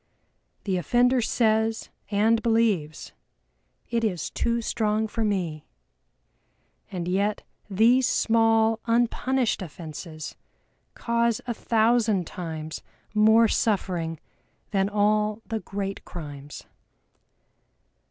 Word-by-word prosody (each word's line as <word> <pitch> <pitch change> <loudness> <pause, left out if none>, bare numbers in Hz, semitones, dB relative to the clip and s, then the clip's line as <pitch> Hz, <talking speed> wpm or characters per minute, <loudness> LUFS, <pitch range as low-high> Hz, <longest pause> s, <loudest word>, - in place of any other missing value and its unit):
The 190 -2 0
offender 245 +7 +3
says 220 0 +1 0.2
and 220 +2 +2
believes, 220 -10 0 0.8
"It 230 -1 0
is 180 -8 -2
too 235 0 0
strong 220 -1 0
for 225 +1 -3
me" 175 -8 -2 1.2
and 175 -2 -4
yet 200 +3 0 0.3
these 235 +6 +4
small 225 -2 +3
unpunished 240 +1 +1
offenses 160 -2 -8 0.6
cause 235 -1 0
a 240 - -2
thousand 225 -4 +2
times 160 -2 -6 0.3
more 220 +2 +5
suffering 180 -7 -1 0.5
than 195 -1 +1
all 210 +1 +1
the 225 -1 -3
great 195 -1 -5
crimes. 145 -4 -9
215 Hz, 95 wpm, -25 LUFS, 185-230 Hz, 1.2 s, more